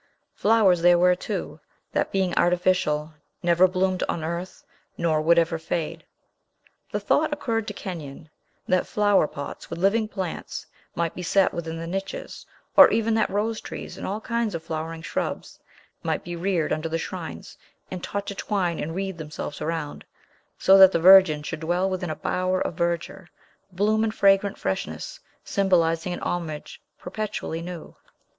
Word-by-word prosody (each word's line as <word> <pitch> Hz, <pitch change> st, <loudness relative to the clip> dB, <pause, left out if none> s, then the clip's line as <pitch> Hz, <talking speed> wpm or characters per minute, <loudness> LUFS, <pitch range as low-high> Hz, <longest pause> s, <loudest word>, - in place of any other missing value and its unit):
Flowers 200 Hz, -5 st, +3 dB
there 175 Hz, 0 st, +6 dB
were, 180 Hz, +1 st, +5 dB
too, 180 Hz, -, -5 dB, 0.3 s
that, -, -, 0 dB
being 190 Hz, -2 st, 0 dB
artificial, 175 Hz, -4 st, +1 dB, 0.3 s
never 175 Hz, +1 st, +5 dB
bloomed 185 Hz, 0 st, 0 dB
on 165 Hz, -, -2 dB
earth, 170 Hz, +3 st, -5 dB, 0.3 s
nor 160 Hz, -2 st, +1 dB
would 170 Hz, +2 st, +4 dB
ever 165 Hz, -1 st, +2 dB
fade. 160 Hz, 0 st, -3 dB, 0.9 s
The -, -, -1 dB
thought 310 Hz, 0 st, +1 dB
occurred 230 Hz, -7 st, -2 dB
to -, -, -4 dB
Kenyon, 160 Hz, -5 st, -7 dB, 0.4 s
that 185 Hz, -1 st, +2 dB
flower 205 Hz, -6 st, +3 dB
pots 140 Hz, -1 st, -8 dB
with -, -, -5 dB
living 205 Hz, +5 st, +2 dB
plants 190 Hz, -5 st, -5 dB, 0.3 s
might 170 Hz, -1 st, -1 dB
be -, -, -7 dB
set 190 Hz, +2 st, +2 dB
within 165 Hz, -1 st, -4 dB
the 165 Hz, -, -5 dB
niches, 195 Hz, +3 st, -5 dB, 0.3 s
or -, -, +10 dB
even 225 Hz, 0 st, +1 dB
that 220 Hz, -1 st, +2 dB
rose 215 Hz, +3 st, -1 dB
trees, -, -, -7 dB
and -, -, -6 dB
all 205 Hz, +3 st, -2 dB
kinds 230 Hz, -3 st, -2 dB
of 165 Hz, -, -5 dB
flowering 160 Hz, +1 st, -5 dB
shrubs, -, -, -4 dB, 0.4 s
might -, -, -2 dB
be 175 Hz, 0 st, -6 dB
reared 170 Hz, -2 st, 0 dB
under 155 Hz, +1 st, -2 dB
the 165 Hz, -, -1 dB
shrines, -, -, -7 dB, 0.4 s
and 185 Hz, -1 st, -6 dB
taught 200 Hz, 0 st, -3 dB
to 200 Hz, -, -4 dB
twine 190 Hz, -4 st, -1 dB
and 165 Hz, +2 st, -4 dB
wreathe 190 Hz, -2 st, -3 dB
themselves 150 Hz, -1 st, -6 dB
around; 160 Hz, -2 st, -3 dB, 0.5 s
so 195 Hz, +1 st, +6 dB
that 190 Hz, -1 st, +10 dB
the 170 Hz, -, +1 dB
Virgin 180 Hz, -4 st, +7 dB
should 160 Hz, +1 st, -5 dB
dwell 175 Hz, +4 st, 0 dB
within 185 Hz, -2 st, -3 dB
a 155 Hz, -, -2 dB
bower 185 Hz, 0 st, -1 dB
of -, -, -2 dB
verdure, 170 Hz, +2 st, -2 dB, 0.4 s
bloom, 210 Hz, +4 st, +1 dB
and 220 Hz, 0 st, -1 dB
fragrant 195 Hz, 0 st, +3 dB
freshness, 95 Hz, -, -4 dB, 0.2 s
symbolizing 175 Hz, -3 st, +1 dB
a -, -, -8 dB
homage 160 Hz, -4 st, -4 dB, 0.2 s
perpetually 190 Hz, -4 st, -4 dB
new. 175 Hz, -1 st, -8 dB
180 Hz, 165 wpm, -25 LUFS, 165-195 Hz, 0.9 s, or